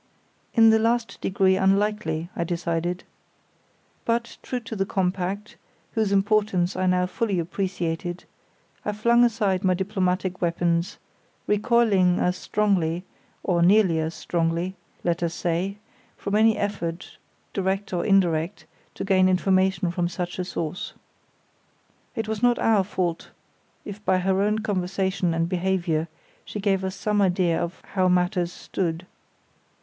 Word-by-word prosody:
In 225 -1 +7
the 220 - +4
last 230 +1 0
degree 190 0 +2
unlikely, 195 -4 +1
I 170 - -1
decided. 170 +1 -2 1.0
But, 235 0 -1
true 250 - -3
to 225 0 -7
the 195 - +1
compact, 190 +2 -2 0.3
whose 220 -3 0
importance 200 -2 +2
I 185 0 0
now 180 0 +3
fully 200 +1 -1
appreciated, 175 -1 -3 0.6
I 210 - -2
flung 235 +3 +4
aside 210 -5 +1
my 185 -1 +3
diplomatic 185 -1 -1
weapons, 170 0 0 0.5
recoiling, 210 -4 +3
as 180 0 +1
strongly, 185 -6 0 0.4
or 175 -3 +1
nearly 185 -2 +5
as 160 +1 -2
strongly, 170 +2 -1 0.3
let 170 0 0
us 170 -1 -1
say, 180 +4 -1 0.4
from 200 - -4
any 220 +1 +4
effort 180 -4 -4 0.3
direct 195 +2 -1
or 175 - 0
indirect 175 -3 +1 0.3
to - - -4
gain 185 -1 +4
information 185 -1 +2
from 175 0 -1
such 180 0 -4
a - - 0
source. 175 -1 -4 1.2
It 225 -1 -2
was 220 -1 -3
not 245 -1 +4
our 215 -3 +3
fault 180 -3 -2 0.6
if 205 0 -8
by 185 - +3
her 190 +1 +1
own 210 +1 +2
conversation 190 -3 -1
and 165 0 +1
behaviour 175 -3 0 0.4
she 210 - -6
gave 195 -2 +1
us 190 +1 -3
some 210 -1 0
idea 180 -3 +2
of 170 +1 -5
how 185 -2 +3
matters 180 -1 +1
stood. 175 -1 -3
185 Hz, 135 wpm, -25 LUFS, 175-205 Hz, 1.2 s, In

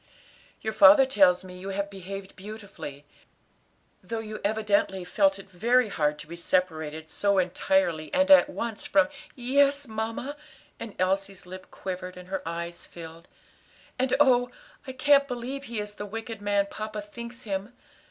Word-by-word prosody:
"Your 220 - -2
father 290 0 +8
tells 190 -8 +4
me 180 -1 -10
you 190 +2 -6
have 200 +1 -3
behaved 195 0 -8
beautifully, 195 -8 -9 1.0
though 230 - -5
you 215 -1 -6
evidently 205 -3 +1
felt 195 +1 +2
it 195 - -12
very 230 +6 +2
hard 150 -5 0
to - - -9
be 170 - -7
separated 160 -3 -1
so 200 +4 +1
entirely 180 - +1
and 280 +1 +3
at 285 +1 +8
once 230 -6 -4
fr 295 - +5 0.3
" - - -26
"Yes, 280 +2 +2
mamma," 225 +6 -4 0.4
and 230 -3 -7
Elsie's 195 +1 -1
lip 185 +1 -10
quivered, 185 -1 -6
and 180 0 -11
her 190 0 -2
eyes 170 +1 -5
filled, 165 0 -11 0.7
"and 260 0 +2
oh, 250 -3 +5 0.4
I - - -3
can't 280 +1 +4
believe 255 +3 -5
he 235 -3 -4
is 210 0 -5
the 205 0 -7
wicked 225 0 -6
man 205 -1 +2
papa 215 -1 -5
thinks 235 +3 -9
him. 200 0 -3
205 Hz, 160 wpm, -27 LUFS, 185-245 Hz, 1.0 s, father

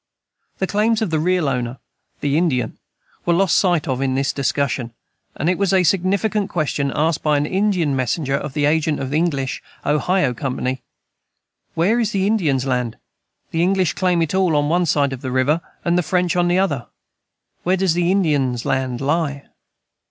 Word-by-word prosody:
The 190 - 0
claims 215 +3 +1
of 195 - -2
the 160 - +1
real 180 -1 +1
owner 125 -1 -2 0.4
the 145 0 0
Indian 135 -9 0 0.4
were 170 - +2
lost 190 0 +3
sight 175 -5 +2
of 130 -1 -1
in 130 -1 0
the 135 - +1
discussion; 135 -4 -1 0.4
and 155 - -2
it 180 +1 +1
was 200 -1 +2
a 185 -1 +4
significant 195 +4 +1
question 145 -4 -1
asked 155 +1 +1
by 150 -1 +2
an 145 - 0
Indian 185 -5 +1
messenger 135 +3 -1
of 140 0 -2
the 145 -1 +1
agent 155 0 +1
of 135 -1 -4
the 150 - +1
English 140 -6 -1 0.2
Ohio 150 0 +1
Company: 130 0 -3 0.9
"Where 200 +9 +2
is 230 -2 0
the 195 -1 +1
Indian's 160 - +1
land? 125 -3 -1 0.5
The 165 - 0
English 185 -2 +2
claim 180 -3 +1
it 160 - -3
all 185 -4 +2
on 145 0 +1
one 175 +1 +2
side 140 -2 +2
of 130 - -7
the 130 - -4
river, 130 +6 +1 0.2
and 175 0 +2
the - - +3
French 180 0 0
on 175 0 +2
the 175 +1 +2
other: 145 -11 0 0.7
where 185 +2 +1
does 185 -3 +2
the 175 +1 +1
Indian's 145 -10 +1
land 130 -2 -1
lie?" 145 -1 -1
155 Hz, 185 wpm, -20 LUFS, 135-180 Hz, 0.9 s, a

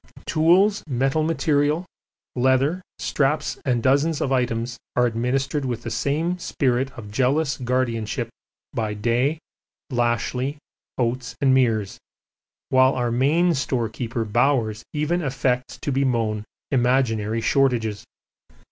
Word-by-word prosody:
Tools, 185 +6 +3
metal 135 +3 +1
material, 155 0 +1 0.5
leather, 130 +7 +2 0.2
straps 150 +2 0
and 120 -4 +1
dozens 145 +4 +2
of 140 - -1
items 120 -2 -1 0.2
are 125 - +4
administered 125 +5 -1
with 120 -3 -3
the 115 - -5
same 160 +9 -1
spirit 130 -4 0
of 105 -3 -9
jealous 135 +6 +1
guardianship 120 -2 -1 0.5
by 110 -2 -2
Day, 120 +8 +1 0.5
Lashly, 125 +3 0 0.4
Oates 125 0 -1
and 135 -2 +4
Meares, 110 -6 +1 0.7
while 130 0 +4
our 120 -2 0
main 155 +8 +3
storekeeper 120 -4 -2
Bowers 115 -1 +1
even 155 +4 0
affects 130 -3 -1
to 145 - -2
bemoan 115 -6 0 0.3
imaginary 120 -4 +1
shortages. 115 -5 +1
130 Hz, 110 wpm, -23 LUFS, 120-140 Hz, 0.7 s, are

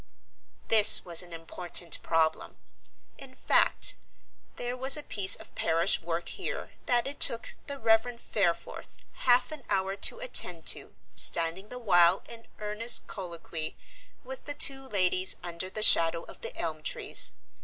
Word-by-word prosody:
This 220 -2 +9
was 170 -1 +3
an 175 -1 -11
important 170 0 -3
problem. 160 -1 -2 0.6
In - - -11
fact, - - +1 0.6
there 245 +1 -6
was 265 +3 +3
a 300 - -7
piece 200 -7 +3
of - - -15
parish 165 +4 -1
work 170 +1 -6
here - - -7 0.2
that 240 -1 0
it 280 +1 -8
took 230 - +3
the 280 -1 -7
Reverend 225 0 0
Fareforth 180 -8 -4 0.2
half 250 +2 +1
an 305 -2 -7
hour 190 0 -2
to 200 - +1
attend 180 - +1
to - - -15 0.2
standing 170 +5 +1
the 250 - -8
while 180 -6 +2
in 230 -1 -11
earnest 215 +3 -1
colloquy 170 -4 -7 0.5
with - - -11
the 290 - -6
two 270 -2 +1
ladies 185 -2 +1
under 175 +1 -6
the 215 +2 -2
shadow 165 -3 +4
of - - -15
the 230 - -9
elm 160 -2 -6
trees. 155 - 0
195 Hz, 150 wpm, -27 LUFS, 170-245 Hz, 0.6 s, This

